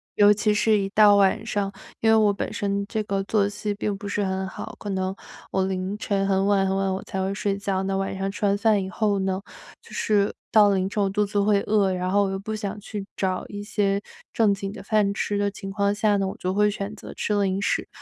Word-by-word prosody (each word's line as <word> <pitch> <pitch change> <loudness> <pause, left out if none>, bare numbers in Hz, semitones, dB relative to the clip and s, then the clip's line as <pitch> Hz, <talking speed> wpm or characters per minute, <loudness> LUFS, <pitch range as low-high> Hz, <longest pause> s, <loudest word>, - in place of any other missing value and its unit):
尤 205 0 +6
其 210 0 +1
是 215 +1 +3
一 195 -1 -1
到 205 0 +6
晚 200 +2 +3
上 200 -2 -1 0.3
因 225 - +3
为 - - +6
我 210 -2 +4
本 - - -4
身 200 0 -1
这 220 - -2
个 195 -1 -1
作 200 0 +1
息 205 0 -3
并 205 -1 -2
不 205 - -7
是 205 0 -1
很 190 0 -2
好， 220 +4 -8
可 205 - -6
能 190 0 -2 0.4
我 190 -1 +1
凌 190 +2 -3
晨 195 -2 -1
很 195 0 +2
晚 195 -1 +3
很 190 - 0
晚 195 -1 0
我 190 - -3
才 190 - -4
会 195 - -1
睡 200 0 -1
觉， 195 -1 -1
那 195 0 -1
晚 195 0 -2
上 195 0 -2
吃 205 - -3
完 200 0 +3
饭 205 -1 +2
以 190 - -5
后 205 0 0
呢， 190 0 -1 0.4
就 - - -18
是 205 -2 +1 0.2
到 215 -2 +7
了 200 - +2
凌 190 0 0
晨 205 - -1
我 195 - +1
肚 210 +1 +1
子 205 0 0
会 200 -1 +3
饿， 200 -3 +2
然 180 0 -2
后 205 0 +4
我 - - -1
又 195 - -2
不 220 +2 -5
想 210 -1 -4
去 205 -1 -6
找 185 -1 -1
一 205 0 -6
些 200 -1 0 0.3
正 215 -3 +3
经 195 0 -4
的 - - -9
饭 205 -1 +2
吃 205 +1 -1
的 205 0 +1
情 195 -1 -7
况 200 0 +1
下 210 -1 +2
呢， 195 -1 0
我 - - -6
就 185 +1 -2
会 210 +1 +3
选 200 0 -5
择 - - -10
吃 210 - -1
零 190 0 0
食。 - - 0
200 Hz, 275 characters per minute, -24 LUFS, 195-210 Hz, 0.4 s, 到